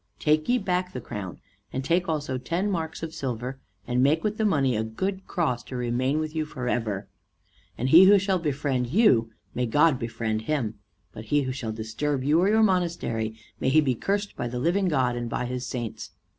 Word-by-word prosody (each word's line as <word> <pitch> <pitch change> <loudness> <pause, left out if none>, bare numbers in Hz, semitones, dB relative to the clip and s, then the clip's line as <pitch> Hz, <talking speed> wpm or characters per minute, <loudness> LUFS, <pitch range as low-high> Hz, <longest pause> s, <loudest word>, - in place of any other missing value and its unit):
Take 155 +3 +1
ye 250 - +4
back 185 -4 -1
the 125 - -4
crown, 105 -7 -7 0.3
and 130 0 -3
take 170 +3 +1
also 145 -5 -2
ten 175 +9 -1
marks 165 -3 -3
of 160 -1 -5
silver, 125 0 -4 0.3
and 125 0 +1
make 150 +5 +3
with 215 0 -1
the 220 - +2
money 140 - +2
a 110 - 0
good 190 - -3
cross, 145 -9 0
to 130 - -8
remain 125 +3 0
with 155 0 -3
you 160 - +1
forever. 120 -8 -3 0.7
And 125 +3 -1
he 170 +6 +9
who 200 +2 +8
shall 190 -1 +1
befriend 140 -5 -1
you, 130 - +4 0.2
may 125 -1 -1
God 145 +2 +3
befriend 115 -2 -2
him; 115 -9 -1 0.3
but 110 - -9
he 145 +6 +2
who 130 - -2
shall 125 -4 -4
disturb 115 +6 -2
you 150 +4 +3
or 190 +3 +3
your 220 +1 +4
monastery, 170 - 0 0.2
may - - +1
he 155 +4 +5
be 140 -4 +2
cursed 200 - -2
by - - -3
the 125 +1 -4
living 175 +8 +1
God 130 -7 +1
and 120 -1 -3
by 125 - -2
his 125 0 -4
saints." 120 -3 -5
135 Hz, 205 wpm, -26 LUFS, 120-170 Hz, 0.7 s, he